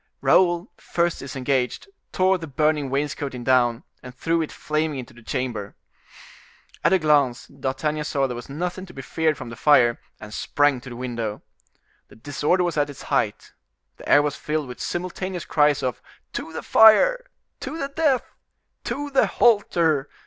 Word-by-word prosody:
Raoul, 175 +1 +3
first 170 0 -1
disengaged, 130 - -2 0.2
tore 185 0 +2
the 165 - -7
burning 150 0 0
wainscoting 140 -2 -3
down, 120 -2 +2 0.2
and 125 0 -11
threw 165 +5 0
it 160 - -4
flaming 155 -1 -2
into 125 - -8
the 120 - -16
chamber. 120 -4 -4 1.1
At - - +4
a 190 - +6
glance 145 -7 +2
D'Artagnan 150 +3 -3
saw 140 -2 0
there 125 -2 -3
was 120 +3 -9
nothing 180 +6 -4
to - - -13
be 135 - -7
feared 160 +1 0
from - - -8
the - - -7
fire, 120 -2 +4 0.2
and 105 -1 -10
sprang 145 0 +1
to 125 - -10
the 120 - -8
window. 120 -4 -4 0.6
The - - -17
disorder 145 +9 0
was 175 -3 -2
at 145 0 +1
its 145 - -10
height. - - -1 0.4
The - - -10
air 145 - +6
was 145 -1 -1
filled 150 -2 -3
with 125 - -9
simultaneous 180 0 -4
cries 150 -2 +2
of 125 -3 -2 0.3
"To - - -5
the 160 - -6
fire!" - - +6 0.3
"To 320 - -5
the 275 -3 -3
death!" 280 -4 +1 0.6
"To 285 +4 -4
the 270 - +3
halter!" 170 - +2
150 Hz, 170 wpm, -23 LUFS, 130-175 Hz, 1.1 s, a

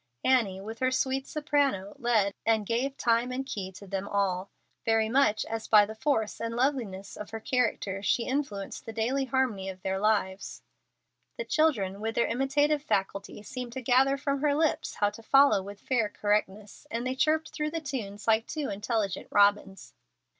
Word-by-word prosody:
Annie, 225 -8 +2
with 220 +3 -8
her 255 - +2
sweet 265 +1 -1
soprano, 285 -10 0
led, 220 -5 +2
and 220 -1 +2
gave 255 +6 -1
time 235 +1 +2
and 265 +1 -3
key 195 -7 -5
to 190 +2 -11
them 195 +1 -4
all, 195 -2 -1 0.3
very 225 -1 +2
much 230 -4 +3
as 225 0 -5
by 210 -1 +7
the 215 - -7
force 220 -2 -1
and 230 0 -3
loveliness 235 -7 -1
of 210 - -8
her 225 - -5
character 220 -5 -1
she 220 +4 +1
influenced 255 -9 -3
the 225 - -5
daily 250 +5 0
harmony 245 -7 0
of 185 -1 -9
their 190 0 -1
lives. 200 -2 -1 0.7
The - - -4
children, 210 -12 +1
with 225 +1 -2
their 235 - +3
imitative 290 +4 +1
faculty, 200 -4 -2
seemed 245 +2 -6
to 260 - -5
gather 265 +3 +4
from 275 0 -1
her 290 -1 +2
lips 315 0 0
how 205 0 +1
to 230 - -12
follow 270 -3 +5
with 200 +1 -9
fair 235 -3 0
correctness, 205 -1 -2
and 235 +2 -3
they 255 - 0
chirped 310 +4 +1
through 300 -1 -2
the 330 +1 -3
tunes 230 -9 -5
like 225 0 +3
two 300 -3 -3
intelligent 205 -1 -2
robins. 205 -1 +2
225 Hz, 180 wpm, -28 LUFS, 200-270 Hz, 0.7 s, by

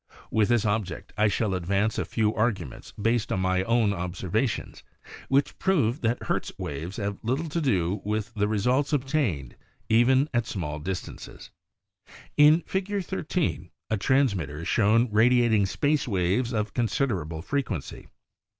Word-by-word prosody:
With 110 -1 +2
this 120 -2 +2
object 105 -4 -2
I 110 0 +3
shall 105 0 0
advance 100 +4 0
a - - -1
few 110 -1 0
arguments 105 - -2
based 115 +1 +1
on - - 0
my 95 0 +1
own 115 -2 +2
observa 95 +5 -1
tions - - -6 0.5
which 135 +1 +1
prove 150 - +1
that 120 +1 0
Hertz - - -2
waves 80 +7 -5
have 100 -2 -3
little 130 +8 -1
to 165 +3 -1
do 95 - 0
with 110 +2 -2
the 105 -1 0
results 125 +8 +1
obtained 130 - -1 0.3
even 130 +5 +4
at 120 -2 0
small 75 -6 -4
distances. 90 +4 -7 0.8
In 150 +3 +6
Fig. 195 +1 -2
13 160 - -2 0.2
a 110 - +2
transmitter 100 - +1
is 85 - -5
shown 115 +3 +3
radiat 120 +2 +4
ing 100 -3 +3
space 145 +7 0
waves 100 +4 0
of 105 -3 -2
considerable 95 - -1
frequency. 135 - -3
110 Hz, 150 wpm, -26 LUFS, 95-130 Hz, 0.8 s, In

